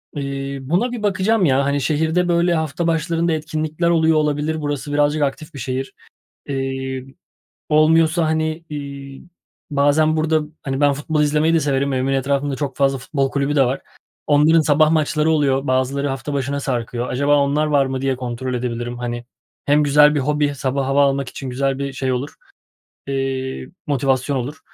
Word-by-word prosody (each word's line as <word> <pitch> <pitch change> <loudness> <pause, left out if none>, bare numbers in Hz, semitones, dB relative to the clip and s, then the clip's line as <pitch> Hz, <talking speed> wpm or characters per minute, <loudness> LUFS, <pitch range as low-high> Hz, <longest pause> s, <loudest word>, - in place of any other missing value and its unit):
Eee, 140 -1 -4
buna 175 - 0
bir 240 -3 -5
bakacağım, 200 0 +2
ya. 135 -1 +2
Hani, 140 0 0
şehirde, 160 +4 +1
böyle, 175 0 +2
hafta 160 +1 -1
başlarında 165 +1 0
etkinlikler 155 +2 -2
oluyor 160 -1 +3
olabilir. 150 +1 0
Burası 145 0 -3
birazcık 145 +1 +2
aktif 150 +3 -3
bir 140 - -8
şehir. 130 +2 -4 0.6
Eee, 135 -1 -3 0.6
olmuyorsa, 160 +2 +4
hani, 155 +1 -1
iii, 140 -1 -7 0.5
bazen 145 +2 +3
burada, 155 0 +2 0.2
hani, 135 0 -3
ben 145 -1 +4
futbol 150 +2 -1
izlemeyi 150 +2 +2
de 165 - +3
severim. 140 -1 0
Evimin 130 +1 0
etrafında 140 +1 0
çok 140 -3 -4
fazla 135 -1 +2
futbol 135 0 -1
kulübü 140 +1 -1
de 135 - +5
var. 130 +2 -1 0.5
Onların 150 +3 +5
sabah 155 0 +3
maçları 155 0 +1
oluyor, 140 -3 +1
bazıları 130 +2 0
hafta 135 +2 -4
başına 140 +1 -2
sarkıyor. 120 -2 -3
Acaba 140 +3 +2
onlar 145 +2 +2
var 145 -3 +2
mı, 130 0 -3
diye 135 -1 0
kontrol 125 0 -4
edebilirim, 120 0 -3
hani. 120 0 -4 0.4
Hem 145 +1 +4
güzel 150 +1 +5
bir 145 - +1
hobi, 145 +1 0
sabah 135 0 -2
hava 140 +1 +3
almak 140 -1 0
için 130 0 -7
güzel 135 +1 -1
bir 140 0 -3
şey 130 -1 -2
olur, 130 +4 -3 0.7
eee, 135 -1 -3 0.2
motivasyon 135 0 0
olur. 140 +5 -5
140 Hz, 165 wpm, -20 LUFS, 135-155 Hz, 0.7 s, de